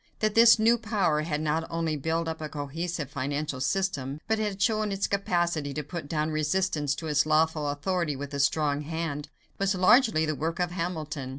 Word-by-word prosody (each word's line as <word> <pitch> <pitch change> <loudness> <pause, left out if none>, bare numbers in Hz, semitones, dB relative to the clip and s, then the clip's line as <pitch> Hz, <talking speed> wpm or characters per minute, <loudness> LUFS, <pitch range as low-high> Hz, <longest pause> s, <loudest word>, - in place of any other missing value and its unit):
That 215 -1 0
this 230 +1 +7
new 230 +2 +4
power 200 -9 +1
had 155 -1 -2
not 155 +1 -1
only 165 -2 -1
built 160 +3 -1
up 160 -1 -4
a 155 - -4
cohesive 150 +1 -4
financial 140 0 -3
system, 145 -4 -1
but 220 -1 +1
had 205 -2 -2
shown 215 +1 +1
its 195 0 0
capacity 175 -7 -1
to 150 - -2
put 160 0 -6
down 155 0 -1
resistance 155 -2 0
to 160 - -6
its 150 0 +2
lawful 155 -1 +2
authority 150 +1 -1
with 140 +1 -7
a 140 - -3
strong 145 0 +1
hand, 150 -1 -4 0.3
was 195 0 +1
largely 185 - +4
the 155 - -1
work 160 +3 -3
of 175 -1 0
Hamilton. 160 -6 -4
160 Hz, 190 wpm, -27 LUFS, 150-185 Hz, 0.3 s, this